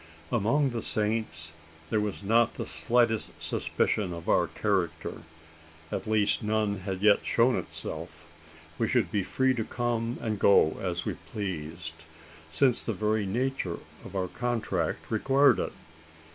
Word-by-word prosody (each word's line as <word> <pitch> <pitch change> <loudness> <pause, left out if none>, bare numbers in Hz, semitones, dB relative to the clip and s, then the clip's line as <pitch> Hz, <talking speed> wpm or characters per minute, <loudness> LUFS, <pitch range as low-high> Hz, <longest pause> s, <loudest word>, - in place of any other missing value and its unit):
Among 125 +5 +2
the 115 -1 -3
Saints, 105 -9 0 0.4
there 110 - +3
was 105 -1 -3
not 115 +3 +3
the - - -4
slightest 115 -2 +1
suspicion 95 -5 0
of 85 0 -8
our 85 - +3
character 90 0 -1 0.7
at - - -3
least 105 -2 +2
none 105 -2 0
had 95 0 -4
yet 105 -1 +5
shown 120 +2 +3
itself. - - -6 0.5
We - - +2
should - - +1
be 105 - +1
free 130 +7 +1
to 115 -3 -1
come 120 0 -2
and 110 -3 -2
go, 80 -6 +5
as 90 -1 -2
we - - -1 0.2
pleased: 80 -5 -5 0.4
since 125 +6 +3
the 115 - -2
very 105 +1 0
nature 120 -5 -1 0.3
of 100 - -10
our 95 -1 0
contract 120 +2 -2
required 135 +6 +4
it. - - -2
105 Hz, 145 wpm, -28 LUFS, 95-115 Hz, 0.7 s, yet